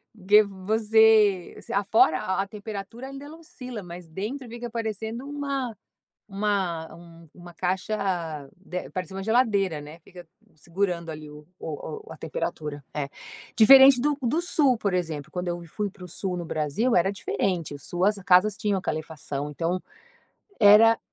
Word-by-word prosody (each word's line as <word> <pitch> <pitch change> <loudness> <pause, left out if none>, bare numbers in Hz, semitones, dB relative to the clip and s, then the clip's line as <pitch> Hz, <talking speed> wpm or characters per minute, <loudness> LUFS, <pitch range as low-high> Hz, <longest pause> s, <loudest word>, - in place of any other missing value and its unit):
porque 210 +1 +5
você, 210 0 +3 0.2
afora 200 -5 +3 0.2
a - - -2
temperatura 215 +4 -7
ainda 275 +1 -9
não 320 - -12
oscila 250 -8 -8
mas 175 -1 -10
dentro 230 - -5
fica 240 +1 -6
parecendo 225 +1 -4
uma 280 -4 -3 0.5
uma 170 -5 -3
uma 175 -1 -12
caixa, 185 +4 -1 0.6
de 180 -1 -6
parece 185 0 -5
uma 195 0 -5
geladeira 205 -8 +2
né 150 +3 -11
fica 175 -1 -13 0.3
segurando 170 +1 -2
ali 155 -1 -9
o 150 0 -13
o 425 - -7
a - - -9
temperatura, 150 - -4
é. 140 -2 -2 0.5
Diferente 265 +2 +8
do 290 +1 +1
do 305 +9 +1
Sul 290 -7 +2
por 200 -3 -1
exemplo 160 -5 -3
quando 180 -1 -3
eu 175 0 -4
fui 205 +5 -3
para 195 -3 -14
o - - -8
Sul 180 +2 -3
no 175 -1 -5
Brasil 155 - 0
era 190 +3 +3
diferente, 180 -5 -2
o 145 - -10
Sul 175 +5 -1
as 210 - +3
casas 190 +3 +4
tinham 205 -3 0
aquela 155 - -2
calefação 150 -2 -6
então, 170 +4 -1 0.8
era 220 +3 +7
195 Hz, 155 wpm, -26 LUFS, 170-225 Hz, 0.8 s, Diferente